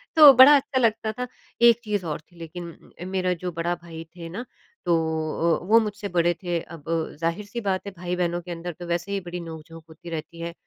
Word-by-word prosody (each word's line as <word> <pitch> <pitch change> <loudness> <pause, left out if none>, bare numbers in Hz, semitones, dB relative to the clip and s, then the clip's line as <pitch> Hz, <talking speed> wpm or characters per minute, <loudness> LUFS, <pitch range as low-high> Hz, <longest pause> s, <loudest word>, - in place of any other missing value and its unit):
तो 300 -3 +11
बड़ा 260 +3 +9
अच्छा 270 -1 +1
लगता 220 -2 +1
था। 250 +3 -5 0.3
एक 235 -1 +7
चीज़ 205 -4 -2
और 155 -2 -3
थी 175 +3 -26
लेकिन, 170 +1 -9 0.2
मेरा 185 -1 +1
जो 180 +1 -5
बड़ा 170 +1 -1
भाई 165 -1 -9
थे 165 -1 -7
ना, 205 +9 -6 0.4
तो 170 - +3 0.7
अ, - - -10
वो 225 +2 +7
मुझसे 210 -1 -3
बड़े 175 -1 +2
थे। 175 -1 0
अब 165 -3 -11 0.4
ज़ाहिर 170 +5 -1
सी 235 +3 -5
बात 195 -2 -1
है - - -4
भाई-बहनों 175 0 -1
के 175 +1 -9
अंदर 170 +1 -5
तो 175 - -7
वैसे 175 +3 -2
ही 200 - 0
बड़ी 175 0 -6
नोक-झोंक 165 -1 -9
होती 160 +2 -11
रहती 165 +1 -6
है। 170 0 -4
175 Hz, 215 wpm, -25 LUFS, 170-210 Hz, 0.7 s, तो